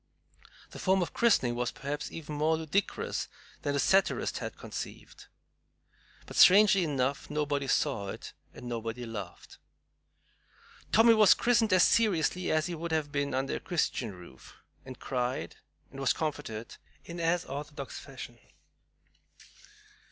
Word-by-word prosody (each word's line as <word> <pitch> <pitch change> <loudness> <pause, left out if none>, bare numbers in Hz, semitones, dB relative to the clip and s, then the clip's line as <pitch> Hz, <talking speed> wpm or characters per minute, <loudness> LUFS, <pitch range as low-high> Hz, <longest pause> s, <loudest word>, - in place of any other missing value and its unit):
The - - -9
form 190 -1 +2
of - - -6
christening 200 - +3
was 120 0 -1
perhaps 145 +2 -5
even 155 -2 -7
more 155 +2 +1
ludicrous 160 +5 -2 0.3
than 145 - -1
the 140 - 0
satirist 195 +7 +2
had - - -6
conceived; - - -8 1.0
but - - -10
strangely 200 0 +7
enough, 140 -3 -1
nobody 145 -2 -1
saw 130 -9 0
it - - -7 0.2
and 125 - -10
nobody 115 0 -4
laughed. 115 -3 -8 1.3
"Tommy" 230 +1 +6
was 215 -3 +6
christened 230 -3 +2
as 185 -2 +6
seriously 180 -5 +2
as 155 0 +2
he 175 - -4
would 170 0 -5
have 155 -2 -1
been 140 -2 -1
under 135 +1 -1
a - - -7
Christian 130 - -2
roof 85 -8 -14 0.3
and 130 -2 -9
cried 125 -1 -3 0.3
and 135 - -10
was 135 -2 +2
comforted 115 -8 -5 0.3
in 170 0 -7
as 170 +1 +1
orthodox 145 -2 -7
fashion. - - -10
150 Hz, 135 wpm, -30 LUFS, 130-175 Hz, 1.3 s, strangely